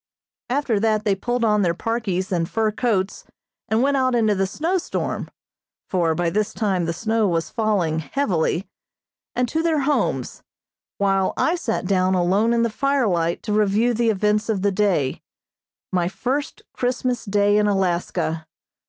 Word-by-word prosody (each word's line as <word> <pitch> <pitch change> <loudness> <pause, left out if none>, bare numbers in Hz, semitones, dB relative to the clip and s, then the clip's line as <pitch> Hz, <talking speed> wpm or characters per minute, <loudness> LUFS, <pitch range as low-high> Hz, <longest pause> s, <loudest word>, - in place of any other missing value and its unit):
After 250 -5 +1
that 215 0 +1
they 205 - +3
pulled 240 +5 -1
on 210 -1 +3
their 170 -3 +1
parkies 195 -4 -2
and 170 -2 0
fur 220 -1 +1
coats 205 -4 -1 0.5
and 220 +3 +2
went 280 0 +2
out 255 -1 +2
into 220 -3 +3
the 195 -1 0
snow 335 - -1
storm - - -3 0.6
(for 170 -4 +1
by 175 0 0
this 210 +2 -1
time 190 -6 0
the 165 - -1
snow 220 +4 0
was 165 -2 -1
falling 200 -9 0
heavily), 180 - -1 0.7
and 250 0 +1
to 320 +7 -1
their 325 -3 +1
homes, 290 +2 -1 0.6
while 195 -1 +1
I 325 - +2
sat 240 - -2
down 185 0 +2
alone 190 +6 +2
in 235 0 +2
the 235 - 0
firelight 215 -11 0
to 210 - -2
review 215 +3 +2
the 230 0 +1
events 210 +1 +1
of 200 -4 0
the 200 - +3
day 185 -9 0 0.7
my 175 -2 +1
first 265 +9 -3
Christmas 250 -1 -1
Day 205 -1 +2
in 210 - +2
Alaska. 175 -4 -1
210 Hz, 160 wpm, -22 LUFS, 185-235 Hz, 0.7 s, they